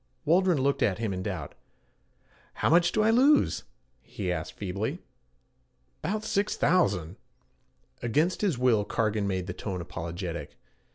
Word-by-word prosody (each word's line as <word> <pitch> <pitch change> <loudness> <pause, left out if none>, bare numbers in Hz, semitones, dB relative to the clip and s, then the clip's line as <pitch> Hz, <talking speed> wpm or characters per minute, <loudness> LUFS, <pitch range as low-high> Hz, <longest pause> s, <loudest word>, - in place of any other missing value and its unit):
Waldron 175 +2 +4
looked 140 +1 +1
at 95 -4 +2
him 110 -3 -2
in 90 - -3
doubt. 95 -6 -4 1.0
'How - - +1
much 170 +1 +5
do 215 - +2
I 220 - +4
lose?' 275 +5 +4 0.4
he - - -4
asked - - -4
feebly. - - -3 1.0
''Bout 215 +2 -1
six 205 -1 0
thousand' 95 - +1 0.8
against 150 +10 +1
his 190 - +1
will 120 -4 +3
Cargan 105 0 0
made 95 -2 -1
the 90 - -5
tone 95 -2 -5
apologetic. 85 +1 -6
115 Hz, 135 wpm, -28 LUFS, -, 1.0 s, much